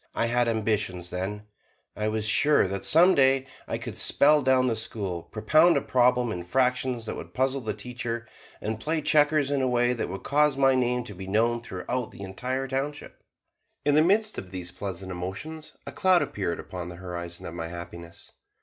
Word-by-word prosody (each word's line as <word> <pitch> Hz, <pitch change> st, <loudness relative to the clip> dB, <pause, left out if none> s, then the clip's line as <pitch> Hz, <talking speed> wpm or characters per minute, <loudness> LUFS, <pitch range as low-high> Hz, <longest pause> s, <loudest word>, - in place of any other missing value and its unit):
I -, -, +1 dB
had 120 Hz, +1 st, +1 dB
ambitions 105 Hz, -6 st, -1 dB
then 100 Hz, +3 st, -4 dB, 0.5 s
I 105 Hz, -, -1 dB
was 110 Hz, 0 st, -1 dB
sure 145 Hz, +1 st, +4 dB
that 95 Hz, +1 st, -4 dB
some 175 Hz, +4 st, +6 dB
day 135 Hz, -2 st, +4 dB, 0.2 s
I -, -, -2 dB
could -, -, -6 dB
spell 150 Hz, +1 st, +5 dB
down 130 Hz, -1 st, +3 dB
the 120 Hz, -3 st, +1 dB
school, 100 Hz, -5 st, -4 dB
propound 155 Hz, -, +3 dB
a -, -, +1 dB
problem 125 Hz, -2 st, +2 dB
in 90 Hz, -4 st, -4 dB
fractions 125 Hz, +3 st, 0 dB
that -, -, -4 dB
would -, -, -9 dB
puzzle 135 Hz, +1 st, +1 dB
the 110 Hz, -3 st, -3 dB
teacher, 120 Hz, -2 st, -5 dB, 0.3 s
and 110 Hz, +1 st, -3 dB
play 155 Hz, +5 st, -1 dB
checkers 150 Hz, -2 st, +3 dB
in 140 Hz, -1 st, +1 dB
a 130 Hz, -, +1 dB
way 120 Hz, 0 st, +2 dB
that 120 Hz, -, -3 dB
would 95 Hz, +1 st, -6 dB
cause 150 Hz, -1 st, +2 dB
my 135 Hz, -1 st, +4 dB
name 125 Hz, -1 st, +1 dB
to 105 Hz, -, -9 dB
be 95 Hz, 0 st, -8 dB
known 115 Hz, +4 st, +1 dB
throughout 120 Hz, +4 st, -4 dB
the -, -, -13 dB
entire 125 Hz, +8 st, -3 dB
township. 140 Hz, +2 st, -4 dB, 0.6 s
In 145 Hz, -, +3 dB
the 155 Hz, -, +6 dB
midst 210 Hz, +6 st, +2 dB
of 95 Hz, -, -9 dB
these 90 Hz, -2 st, -4 dB
pleasant 95 Hz, -2 st, -6 dB
emotions, 95 Hz, -, -6 dB
a -, -, -6 dB
cloud 185 Hz, -2 st, +3 dB
appeared 95 Hz, -4 st, -3 dB
upon 90 Hz, -2 st, -7 dB
the 90 Hz, -, -8 dB
horizon 85 Hz, -1 st, -7 dB
of 85 Hz, -, -6 dB
my 80 Hz, -1 st, -4 dB
happiness. 85 Hz, 0 st, -9 dB
120 Hz, 195 wpm, -26 LUFS, 95-135 Hz, 0.6 s, some